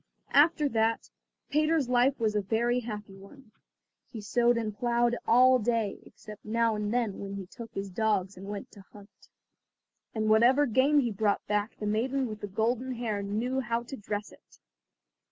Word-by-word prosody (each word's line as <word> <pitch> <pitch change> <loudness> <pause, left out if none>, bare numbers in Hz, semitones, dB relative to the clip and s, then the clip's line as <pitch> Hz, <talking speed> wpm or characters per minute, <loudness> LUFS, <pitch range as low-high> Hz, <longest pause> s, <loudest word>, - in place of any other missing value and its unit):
After 300 +1 +4
that 225 -1 0 0.4
Peter's 305 -1 +2
life 250 +2 +2
was 220 -2 +1
a 210 - +2
very 235 +5 0
happy 210 -4 -7
one. 215 +5 -16 0.6
He 230 - -8
sowed 235 +3 +2
and 215 -3 -3
ploughed 240 +1 +1
all 255 +2 +6
day, 225 -3 -1
except 210 0 -13
now 230 +1 +1
and 210 0 -2
then 235 -5 -1
when 200 0 -6
he 195 -1 -6
took 230 +5 -11
his 195 0 -4
dogs 200 -1 0
and 190 +2 -10
went 205 -1 -6
to 205 - -14
hunt. 200 -1 -17 0.9
And 215 -1 -1
whatever 240 +6 +5
game 280 +4 +3
he 240 -3 -1
brought 205 0 0
back 210 +1 -2
the 210 - -5
maiden 250 +6 0
with 215 -1 -8
the 205 - -4
golden 235 +6 -1
hair 220 -4 -2
knew 225 +6 -2
how 235 -1 -2
to 255 +3 -8
dress 205 -2 -5
it. - - -21
225 Hz, 175 wpm, -29 LUFS, 210-245 Hz, 0.9 s, all